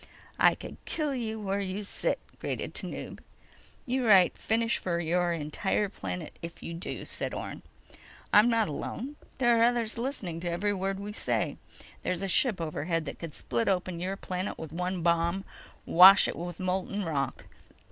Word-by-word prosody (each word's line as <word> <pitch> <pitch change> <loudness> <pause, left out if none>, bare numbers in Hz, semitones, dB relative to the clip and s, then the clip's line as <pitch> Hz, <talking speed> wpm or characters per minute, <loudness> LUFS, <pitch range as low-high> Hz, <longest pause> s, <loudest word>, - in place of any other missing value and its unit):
_ - - -15 0.4
"I - - +6
could - - -9
kill 300 -3 -1
you 220 -4 -3
where 200 -1 -1
you 195 +1 -3
sit!" 200 - -1 0.2
grated - - -3
Tanub. - - -6 0.7
"You 255 -1 0
write 190 -4 +6
finish 230 +1 +1
for 170 -2 -1
your 175 +1 +1
entire 170 +6 -1
planet 90 - -6
if 170 0 -8
you 170 - -5
do," 170 - -5
said - - -3
Orne. - - -6 0.7
"I'm 210 +3 +7
not 230 -2 +2
alone. 250 - -5 0.2
There 240 -2 +4
are - - +3
others 235 -1 +1
listening 215 - -3
to 175 +1 -3
every 195 +5 0
word 195 0 -2
we 205 +1 -6
say. - - -1 0.4
There's 180 +1 -1
a - - 0
ship 205 +2 +3
overhead 165 0 -2
that - - -6
could 165 -4 -7
split 120 -2 -1
open 180 -2 0
your 190 +3 -2
planet 185 +1 -4
with 160 -3 -7
one 180 0 -2
bomb—wash 175 +2 +5
it - - -3
with 175 0 -6
molten 190 +2 -1
rock. 140 -5 -2
185 Hz, 170 wpm, -29 LUFS, 170-210 Hz, 0.7 s, I'm